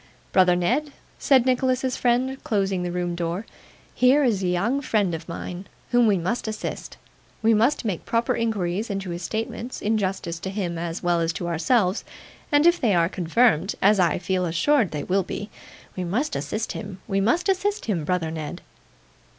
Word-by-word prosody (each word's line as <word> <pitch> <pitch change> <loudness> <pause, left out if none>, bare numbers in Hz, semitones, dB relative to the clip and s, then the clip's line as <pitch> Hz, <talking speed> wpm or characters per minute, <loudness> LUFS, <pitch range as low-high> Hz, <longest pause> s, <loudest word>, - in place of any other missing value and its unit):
'Brother 180 -1 +5
Ned,' 260 +12 0 0.3
said 265 -3 +4
Nicholas's 255 0 +1
friend, 255 +2 0
closing 195 -3 0
the 175 0 -2
room 175 0 -2
door, 170 +4 -3 0.5
'here 265 +4 +4
is 220 -7 +1
a 185 - 0
young 205 +10 +1
friend 210 -9 +1
of 165 +1 -6
mine 180 +2 -6 0.2
whom 240 -1 +5
we 200 -2 +3
must 185 +8 -2
assist. 215 - -5 0.5
We 225 +1 +5
must 230 +5 +2
make 195 -6 -2
proper 230 0 0
inquiries 210 -2 -1
into 195 -2 -3
his 170 +1 -5
statements, 225 +6 -4
in 215 +1 +1
justice 185 -4 -3
to 190 - -5
him 185 -4 -3
as 170 +1 -4
well 175 -1 +2
as 165 0 +1
to 175 - -4
ourselves, 185 +4 +1 0.5
and 290 +1 +4
if 345 0 +4
they 215 -6 +3
are 170 0 +3
confirmed 190 0 +2
as 205 +1 +4
I 175 -2 +3
feel 185 0 -1
assured 205 - +2
they 150 -2 -4
will 195 +2 +1
be 200 +3 -6 0.4
we 185 - -3
must 245 - -1
assist 215 +1 -3
him, 200 -3 -7
we 195 -2 0
must 285 - +1
assist 400 +2 0
him, 185 -8 -1
brother 165 0 -1
Ned. 160 +2 -6
195 Hz, 185 wpm, -24 LUFS, 175-240 Hz, 0.5 s, Brother